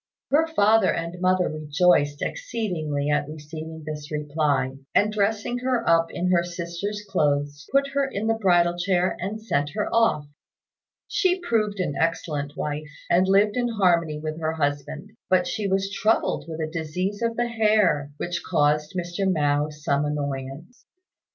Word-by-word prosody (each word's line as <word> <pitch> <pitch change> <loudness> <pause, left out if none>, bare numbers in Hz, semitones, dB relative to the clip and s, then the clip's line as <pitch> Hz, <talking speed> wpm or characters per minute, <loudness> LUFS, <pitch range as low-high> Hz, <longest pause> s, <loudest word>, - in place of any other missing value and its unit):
Her 315 +3 +4
father 225 -8 +4
and 170 +2 -4
mother 185 0 +3
rejoiced 150 -1 +2
exceedingly 165 - -2
at 145 - +1
receiving 160 +1 -8
this 150 0 -6
reply; 150 -3 0 0.2
and 210 +1 +3
dressing 215 +3 0
her 250 -2 -1
up 165 0 +4
in 180 +1 -1
her 170 -1 +3
sister's 175 +4 -5
clothes, 145 -3 0
put 275 0 +3
her 275 0 0
in 205 -1 -3
the 225 - +3
bridal 175 -5 +3
chair 180 0 +1
and 200 +5 -4
sent 145 -10 -1
her 210 - -2
off. 225 -10 +3 0.8
She 370 -1 +1
proved 215 - 0
an 180 -6 -1
excellent 150 -3 -1
wife, 150 +1 -3 0.2
and 185 +2 +4
lived 200 +2 +4
in 245 -1 +1
harmony 175 -8 +2
with 155 +1 -5
her 160 0 -1
husband; 150 +4 -3 0.2
but 185 -1 +3
she 210 +1 -2
was 195 0 0
troubled 215 +3 +1
with 160 -1 -6
a 155 0 -3
disease 180 +6 -3
of 230 0 0
the 240 0 +1
hair, 210 -10 +2
which 175 +1 -3
caused 150 +1 +1
Mr. 180 +2 -1
Mao 145 -2 +1
some 150 -1 -1
annoyance. 145 - -4
175 Hz, 155 wpm, -24 LUFS, 150-210 Hz, 0.8 s, Her